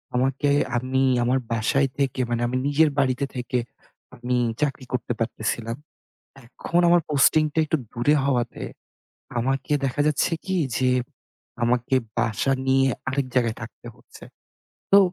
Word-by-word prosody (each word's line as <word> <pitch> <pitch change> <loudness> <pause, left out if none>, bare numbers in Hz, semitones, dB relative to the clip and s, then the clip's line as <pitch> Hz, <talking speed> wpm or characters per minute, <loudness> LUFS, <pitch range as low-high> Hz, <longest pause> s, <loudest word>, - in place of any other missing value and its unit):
আমাকে 135 +3 +1 0.3
আমি 130 +2 0 0.2
আমার 130 +2 +2
বাসায় 130 +5 +1
থেকে 135 -2 0
মানে 120 0 -1
আমি 125 +1 -1
নিজের 150 +2 +4
বাড়িতে 130 0 +1
থেকে 125 0 -2 0.6
আমি 125 +1 -2 0.3
চাকরি 140 -3 -1
করতে 120 -1 -1
পারতেছিলাম। 115 0 -2 0.7
এখন 170 +8 -2
আমার 175 0 +5
পোস্টিংটা 150 +2 +3
একটু 160 - 0
দূরে 125 +5 +2
হওয়াতে, 125 -4 -1 0.8
আমাকে 135 +4 -1
দেখা 135 +2 -1
যাচ্ছে 150 +2 +1
কী, 190 -1 -1 0.2
যে 130 - +2 0.7
আমাকে 120 +2 +1 0.2
বাসা 115 +3 +1
নিয়ে 135 0 +4 0.2
আরেক 135 0 -1
জায়গায় 120 -3 +1
থাকতে 120 +1 -10
হচ্ছে। - - -15 0.7
তো 200 - +9
130 Hz, 130 wpm, -24 LUFS, 120-140 Hz, 0.8 s, তো